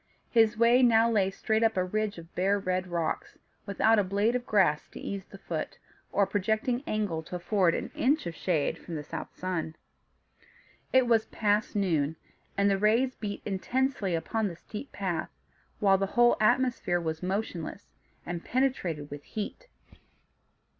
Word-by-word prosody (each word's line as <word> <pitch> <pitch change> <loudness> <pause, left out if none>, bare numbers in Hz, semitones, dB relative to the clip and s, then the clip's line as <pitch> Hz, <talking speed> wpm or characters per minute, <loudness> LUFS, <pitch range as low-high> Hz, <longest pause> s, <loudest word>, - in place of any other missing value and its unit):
His 225 -1 +4
way 235 +2 +5
now 230 -1 +5
lay 200 -4 +3
straight 220 +3 0
up 225 -3 +2
a 185 - +3
ridge 215 +1 -2
of 165 0 -12
bare 195 +3 +2
red 185 -1 -1
rocks, 170 -2 -3 0.3
without 215 +2 +3
a - - +3
blade 200 +5 +1
of 250 0 -2
grass 185 -8 +3
to - - -10
ease 195 -1 -5
the 195 - -12
foot, 165 -4 -5 0.3
or 200 - +3
a - - +1
projecting 220 +5 0
angle 205 -7 -1
to 160 - -8
afford 180 -1 +2
an - - -4
inch 290 +5 +1
of 170 - -4
shade 165 -4 -1
from 170 - -7
the 150 - -4
south 160 +2 -6
sun. 175 -4 -3 1.2
It 260 -1 +5
was 225 -2 +3
past 210 +1 0
noon, 160 -7 +1 0.4
and 200 0 +3
the 195 -1 +2
rays 230 +5 +3
beat 205 -4 -6
intensely 210 -1 0
upon 215 +6 -1
the 175 - -6
steep 215 +10 -9
path, 185 -5 -2 0.5
while 195 -3 +4
the 195 - 0
whole 240 0 +6
atmosphere 215 -5 +2
was 160 -2 -3
motionless, 190 -1 -4 0.3
and 175 0 -4
penetrated 185 - -1
with 145 0 -6
heat. 220 - -6
200 Hz, 165 wpm, -29 LUFS, 175-225 Hz, 1.2 s, whole